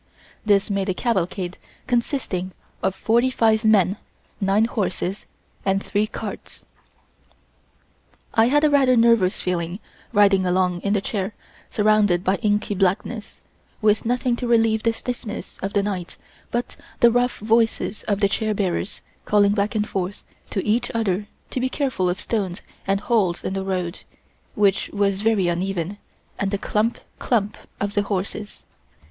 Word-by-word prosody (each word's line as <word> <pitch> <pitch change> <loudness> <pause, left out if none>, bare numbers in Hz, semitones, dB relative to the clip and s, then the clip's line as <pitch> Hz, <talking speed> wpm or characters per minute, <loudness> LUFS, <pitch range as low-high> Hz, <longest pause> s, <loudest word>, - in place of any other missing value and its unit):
This 205 -1 +3
made 195 0 0
a 185 - 0
cavalcade 185 -5 -1 0.3
consisting 235 -7 -1 0.3
of 190 0 0
forty 235 +5 +2
five 225 -3 +2
men, 205 -3 +4 0.4
nine 200 +2 +3
horses 195 -3 -2 0.4
and 195 0 +2
three 210 +1 +1
carts. - - -8 1.7
I 225 0 +5
had 295 +4 +3
a 305 - +5
rather 265 -3 +4
nervous 230 -5 +4
feeling 175 0 -1 0.3
riding 200 -3 +5
along 180 -1 +1
in 200 - 0
the 205 - +2
chair 200 0 -3 0.3
surrounded 210 -4 +3
by 190 +1 +2
inky 210 +1 0
blackness, 205 +3 -1 0.4
with 215 -1 +3
nothing 245 +1 +1
to 245 - -3
relieve 225 -2 +3
the 230 - +2
stillness 235 -1 -6
of 195 - -4
the 200 - +2
night 190 -4 -4 0.3
but 240 0 -3 0.2
the 235 - +6
rough 245 +1 +1
voices 225 -1 +1
of 205 -1 0
the 200 - +5
chair 215 +2 -1
bearers 190 0 -2 0.2
calling 205 -1 +4
back 205 +2 0
and 210 -1 +1
forth 190 +1 -3 0.3
to 195 - -2
each 230 +3 +1
other 205 -2 0 0.2
to - - -2
be 260 +1 0
careful 255 -10 0
of 180 +2 -2
stones 200 -5 -2 0.2
and 195 0 +1
holes 205 -6 +1
in - - -2
the 195 0 -2
road, 185 -2 -2 0.6
which 200 -2 +2
was 200 -1 0
very 215 -4 +2
uneven, 180 +2 -2 0.4
and 200 - 0
the 200 - -1
clump, 215 +4 0 0.2
clump 215 -3 0 0.2
of 200 0 -2
the 205 - +2
horses. 205 +1 -4
205 Hz, 155 wpm, -23 LUFS, 190-225 Hz, 1.7 s, the